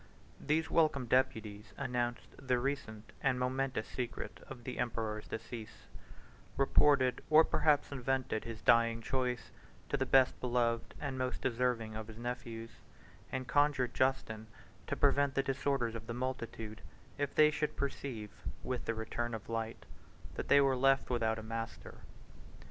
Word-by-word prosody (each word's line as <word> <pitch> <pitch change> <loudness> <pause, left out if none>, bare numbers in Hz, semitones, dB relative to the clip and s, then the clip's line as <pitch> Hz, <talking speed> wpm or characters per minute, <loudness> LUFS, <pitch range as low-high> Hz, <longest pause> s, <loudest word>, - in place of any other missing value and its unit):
These 160 +2 +1
welcome 155 -6 +3
deputies 110 -5 0
announced 120 -2 -2
the 130 -2 0
recent 120 -5 -3
and 130 -2 +2
momentous 130 -2 0
secret 125 -2 -5
of 125 -3 -9
the 125 - -5
emperor's 110 -3 -2
decease; 110 0 -7 0.7
reported, 135 -1 +4
or 155 +1 +8
perhaps 150 -3 +2
invented, 130 -3 -1
his 115 -2 -7
dying 115 0 +4
choice 125 -1 -1 0.4
of 140 - +1
the 130 - 0
best 130 -1 +4
beloved 120 -2 0
and 135 -3 -3
most 130 0 -2
deserving 120 -3 0
of 110 0 -5
his 110 -1 -10
nephews, 120 -1 -5 0.6
and 130 -1 -3
conjured 140 -2 +2
Justin 130 -5 0 0.4
to - - -1
prevent 140 -1 +3
the 135 - +2
disorders 135 -3 0
of 110 -1 -7
the 115 - -4
multitude, 115 -4 -4 0.4
if 145 -1 -1
they 150 0 +7
should 150 0 -2
perceive, 130 -6 -3 0.3
with 125 -1 -3
the 115 - -1
return 115 +1 -3
of 110 - -9
light, 115 0 -3 0.5
that - - -4
they 140 - +7
were 135 -1 +4
left 135 +1 +3
without 110 -2 +1
a 110 - -6
master. 115 +1 -6
125 Hz, 150 wpm, -34 LUFS, 115-135 Hz, 0.7 s, or